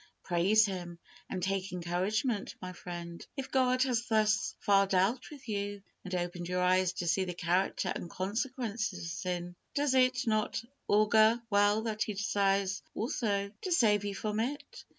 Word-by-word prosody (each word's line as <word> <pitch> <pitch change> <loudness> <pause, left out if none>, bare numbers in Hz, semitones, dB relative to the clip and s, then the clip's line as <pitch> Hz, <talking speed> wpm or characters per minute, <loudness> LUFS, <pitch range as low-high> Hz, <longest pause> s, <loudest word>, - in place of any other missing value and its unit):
Praise 190 +5 +4
Him, 175 -4 -5 0.3
and 185 -2 -3
take 195 0 -1
encouragement, 190 +6 -1
my 185 0 -6
friend. 170 -1 -7
If 265 -1 -5
God 255 -1 +3
has 245 -3 0
thus 215 -1 +2
far 200 -2 +4
dealt 195 +7 +1
with 285 -3 -12
you, 205 -1 -3 0.2
and 185 -1 -4
opened 175 0 -3
your 180 0 0
eyes 185 0 +3
to 175 - -4
see 180 +3 +2
the 180 -2 -4
character 180 +2 0
and 170 - -6
consequences 220 - -2
of - - -6
sin, 175 +1 -4 0.2
does 285 -2 +2
it 255 0 +3
not 215 -2 +1 0.3
augur 215 +2 +5
well 205 +2 +4
that 220 -1 -3
He 210 - 0
desires 195 -1 +1
also 205 -5 -1
to 370 - -4
save 210 - +4
you 200 -1 -3
from 210 +2 -2
it? 265 +6 -4
200 Hz, 165 wpm, -31 LUFS, 185-225 Hz, 0.3 s, augur